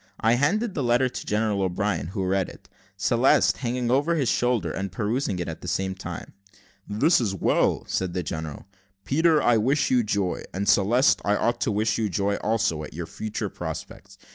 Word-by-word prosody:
I 115 Hz, +1 st, +3 dB
handed 200 Hz, -, +1 dB
the 145 Hz, -, -2 dB
letter 125 Hz, +1 st, +2 dB
to -, -, -7 dB
General 105 Hz, -1 st, 0 dB
O'Brien, 95 Hz, -3 st, -1 dB
who 95 Hz, +1 st, -3 dB
read 95 Hz, 0 st, 0 dB
it; -, -, -15 dB, 0.3 s
Celeste -, -, +3 dB
hanging 125 Hz, -1 st, -2 dB
over 145 Hz, +6 st, +2 dB
his 140 Hz, -6 st, +1 dB
shoulder, 120 Hz, -2 st, +1 dB
and 95 Hz, -1 st, -4 dB
perusing 110 Hz, +2 st, -1 dB
it 90 Hz, -, -3 dB
at -, -, -6 dB
the -, -, -8 dB
same 95 Hz, 0 st, -1 dB
time. 95 Hz, -, -8 dB, 0.6 s
"This 135 Hz, -, +3 dB
is 100 Hz, -5 st, -1 dB
well," -, -, +1 dB
said 95 Hz, -1 st, -2 dB
the 90 Hz, -, -1 dB
general. 80 Hz, -2 st, -6 dB, 0.4 s
"Peter, 160 Hz, +2 st, +3 dB
I 120 Hz, -1 st, +4 dB
wish 135 Hz, +7 st, +1 dB
you 125 Hz, -1 st, +4 dB
joy; 100 Hz, -4 st, -1 dB
and, 100 Hz, +1 st, -2 dB
Celeste, 115 Hz, +7 st, +4 dB
I 105 Hz, -, +2 dB
ought 120 Hz, +3 st, 0 dB
to -, -, +1 dB
wish 105 Hz, +1 st, 0 dB
you 110 Hz, -2 st, 0 dB
joy 100 Hz, +3 st, 0 dB
also, 105 Hz, -8 st, 0 dB
at 75 Hz, -, -9 dB
your 85 Hz, 0 st, -4 dB
future 110 Hz, +5 st, -4 dB
prospects. 95 Hz, 0 st, -8 dB
105 Hz, 190 wpm, -25 LUFS, 95-125 Hz, 0.6 s, I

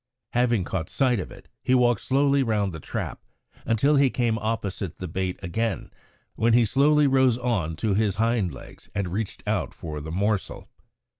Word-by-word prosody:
Having 120 Hz, -4 st, +2 dB
caught 85 Hz, -2 st, -3 dB
sight 125 Hz, -5 st, +2 dB
of 90 Hz, -, -5 dB
it, -, -, -14 dB
he 130 Hz, -, +2 dB
walked 120 Hz, -4 st, +3 dB
slowly 140 Hz, +1 st, +2 dB
round 105 Hz, -6 st, 0 dB
the 80 Hz, -, -6 dB
trap -, -, -5 dB, 0.5 s
until 140 Hz, +6 st, +3 dB
he 140 Hz, -1 st, +5 dB
came 115 Hz, -3 st, 0 dB
opposite 100 Hz, -5 st, -3 dB
the 90 Hz, -, -5 dB
bait 90 Hz, +2 st, -2 dB
again, 100 Hz, 0 st, -2 dB, 0.4 s
when 115 Hz, +1 st, +2 dB
he 120 Hz, 0 st, +5 dB
slowly 145 Hz, +5 st, +4 dB
rose 130 Hz, -3 st, +4 dB
on 105 Hz, -11 st, -1 dB
to 105 Hz, +5 st, 0 dB
his 100 Hz, -1 st, +1 dB
hind 110 Hz, -3 st, +1 dB
legs 65 Hz, -, -13 dB
and 100 Hz, -3 st, -1 dB
reached 110 Hz, +1 st, -4 dB
out -, -, -1 dB
for 75 Hz, -2 st, -6 dB
the 80 Hz, -, -7 dB
morsel. 100 Hz, +3 st, -1 dB
110 Hz, 175 wpm, -25 LUFS, 95-125 Hz, 0.5 s, he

